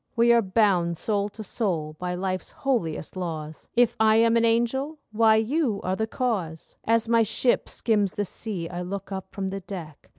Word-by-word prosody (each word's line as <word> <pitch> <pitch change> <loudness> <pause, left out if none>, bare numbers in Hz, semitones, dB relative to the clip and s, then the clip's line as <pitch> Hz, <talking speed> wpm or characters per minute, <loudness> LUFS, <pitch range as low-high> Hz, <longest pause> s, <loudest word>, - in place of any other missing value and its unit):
We 235 +1 +5
are 235 - +5
bound 185 -5 +2
soul 205 +1 -1
to 215 +1 -9
soul 165 -9 -2
by 180 0 -2
life's 185 0 -3
holiest 210 - -2
laws; 160 -4 -5
If 240 -1 +4
I 220 0 +5
am 230 +1 +4
an 230 - +3
angel—why, 230 -1 +2
you 225 0 +1
are 185 +1 0
the 220 +2 -1
cause. 195 -11 -3
As 230 0 +2
my 230 0 +4
ship 230 +3 +1
skims 205 -4 0
the 205 - -1
sea, 185 -3 -5
I 175 +1 -5
look 195 +2 -5
up 190 -1 -5
from 195 -1 -3
the 195 +1 -4
deck. 180 -6 -9
205 Hz, 185 wpm, -25 LUFS, 180-230 Hz, -, We